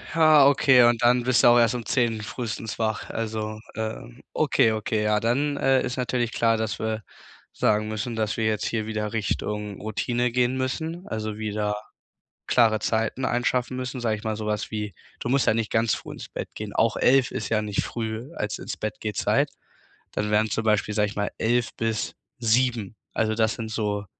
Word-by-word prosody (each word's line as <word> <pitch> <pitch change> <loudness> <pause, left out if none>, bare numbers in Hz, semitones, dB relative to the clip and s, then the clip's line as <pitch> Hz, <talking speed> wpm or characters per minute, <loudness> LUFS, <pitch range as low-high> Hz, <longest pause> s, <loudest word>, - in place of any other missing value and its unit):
Ja, 155 -4 +7
okay, 135 -3 +6
und 120 -1 +4
dann 125 +1 +5
bist 125 0 +3
du - - +8
auch 120 0 +7
erst 115 +1 +3
um 120 -2 -4
10:00 115 -1 +1
frühestens 110 0 -5
wach. 110 -1 -1
Also, 110 -1 -3 0.2
ähm, 110 - -5
okay, 110 - +3
okay, 110 0 -1
ja, 105 0 +2
dann, 140 +6 +1
äh, 135 -1 +3
ist 125 - -3
natürlich 125 -2 -1
klar, 115 -1 +2
dass 110 0 -2
wir 110 -1 -2 0.5
sagen 105 0 +1
müssen, 110 +2 -3
dass 110 -1 -1
wir 110 - 0
jetzt 110 -1 0
hier 110 -2 -1
wieder 105 -1 -3
Richtung 105 -1 -2
Routine 120 +3 -1
gehen 125 +1 +1
müssen, 160 +7 -3
also 110 -1 -4
wieder 105 -1 -1 0.7
klare 110 -3 +4
Zeiten 115 +4 -1
schaffen 125 +1 0
müssen, 130 0 -4
sage 110 -2 0
ich 105 - -12
mal, 110 -1 -1
so 110 0 -5
was 105 0 -2
wie 105 -1 -3 0.3
du - - -3
musst 135 +1 +2
ja - - +5
nicht 115 -1 -2
ganz 110 -1 +2
früh - - -8
ins - - -9
Bett - - -6
gehen, - - -6
auch - - +2
11:00 130 0 +4
ist 110 - -3
ja 110 -1 +2
nicht 105 -2 -1
früh 115 +5 -5
als 105 0 -3
Ins-Bett-Geh-Zeit, 105 -1 -1 0.6
dann 105 0 -2
wären 110 +1 +3
zum 115 - -1
Beispiel, 105 -1 +1
sage 105 0 +2
ich 105 - -8
mal, 105 0 -1
11:00 120 +1 +1
bis 115 -1 -2 0.2
7:00. 115 -3 +1 0.2
Also 110 0 +1
das 110 +1 +1
sind 115 -2 -6
so, 105 -2 -2
110 Hz, 195 wpm, -25 LUFS, 110-120 Hz, 0.7 s, du